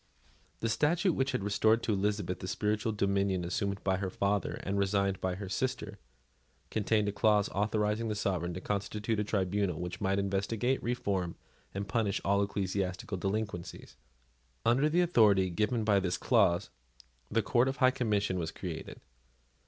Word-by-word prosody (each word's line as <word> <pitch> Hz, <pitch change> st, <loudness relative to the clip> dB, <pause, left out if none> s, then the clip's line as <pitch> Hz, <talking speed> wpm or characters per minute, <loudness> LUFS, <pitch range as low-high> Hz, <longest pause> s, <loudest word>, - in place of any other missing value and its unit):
The 115 Hz, -, 0 dB
statute, 165 Hz, -, +2 dB
which 135 Hz, -1 st, 0 dB
restored 110 Hz, +1 st, +2 dB
to 110 Hz, -, +1 dB
Elizabeth 100 Hz, -1 st, -1 dB
the 95 Hz, -, -6 dB
spiritual 105 Hz, +3 st, 0 dB
dominion 100 Hz, -3 st, 0 dB
assumed 100 Hz, +3 st, -2 dB
by 95 Hz, -1 st, +1 dB
her 95 Hz, 0 st, -2 dB
father 100 Hz, +2 st, 0 dB
and 100 Hz, +1 st, -1 dB
resigned 100 Hz, -1 st, +1 dB
by 95 Hz, -1 st, -1 dB
her 100 Hz, +1 st, -6 dB
sister, 100 Hz, 0 st, -3 dB, 0.7 s
contained 105 Hz, 0 st, +1 dB
a -, -, +1 dB
clause 105 Hz, 0 st, +3 dB
authorising 105 Hz, +2 st, 0 dB
the 105 Hz, -, -1 dB
sovereign 90 Hz, -4 st, -1 dB
to 90 Hz, -, -5 dB
constitute 105 Hz, +2 st, -2 dB
a -, -, +1 dB
tribunal 100 Hz, -3 st, 0 dB
which 90 Hz, +3 st, -5 dB
might 95 Hz, -1 st, +1 dB
investigate, 100 Hz, +6 st, 0 dB
reform, 100 Hz, -8 st, -1 dB, 0.4 s
and 100 Hz, +1 st, -3 dB
punish 110 Hz, -3 st, 0 dB
all 100 Hz, +1 st, +3 dB
ecclesiastical 95 Hz, 0 st, -2 dB
delinquencies. 95 Hz, -2 st, -4 dB, 0.7 s
Under 135 Hz, +6 st, +4 dB
the 175 Hz, +3 st, +3 dB
authority 105 Hz, -, +4 dB
given 110 Hz, +5 st, 0 dB
by 105 Hz, -2 st, +4 dB
this 90 Hz, -2 st, -1 dB
clause, 100 Hz, -8 st, +2 dB, 0.6 s
the 115 Hz, 0 st, +1 dB
Court 120 Hz, +4 st, +3 dB
of 135 Hz, +1 st, -2 dB
High 130 Hz, -1 st, +5 dB
Commission 105 Hz, -7 st, 0 dB
was 80 Hz, -2 st, -2 dB
created. 85 Hz, -3 st, -7 dB
100 Hz, 155 wpm, -31 LUFS, 95-110 Hz, 0.7 s, High